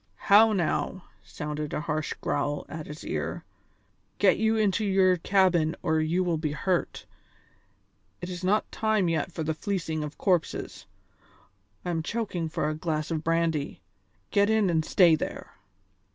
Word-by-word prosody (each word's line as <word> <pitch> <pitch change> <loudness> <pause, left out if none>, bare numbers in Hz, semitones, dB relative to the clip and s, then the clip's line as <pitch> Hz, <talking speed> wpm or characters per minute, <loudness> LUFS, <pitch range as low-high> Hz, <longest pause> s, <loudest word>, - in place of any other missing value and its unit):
"How 220 +2 +8
now!" 185 0 -1 0.2
sounded 150 -1 -5
a - - -2
harsh 155 -2 -2
growl 145 0 -1
at 155 -1 -7
his 150 +1 -9
ear. - - -3 0.7
"Get - - +4
you 220 0 +2
into 215 0 +1
your 190 -2 +3
cabin 175 -3 +2
or 160 -1 +2
you 165 +4 +1
will 170 -3 0
be 155 -2 -2
hurt. 175 +4 -1 1.1
It 175 - -6
is 180 0 -6
not 200 +4 +1
time 220 -5 +1
yet 165 +2 -1
for 160 - -4
the 160 +1 -1
fleecing 160 -1 -3
of 150 0 -7
corpses! 180 -5 -1 1.0
I 175 - -1
am 165 -1 -1
choking 185 -4 -3
for 150 - -1
a 155 - -1
glass 155 0 -3
of 160 -1 -2
brandy. 165 -3 -1 0.5
Get 200 0 +3
in 220 -4 +3
and 160 -1 +1
stay 170 +1 +5
there!" 155 - -3
170 Hz, 155 wpm, -27 LUFS, 155-190 Hz, 1.1 s, How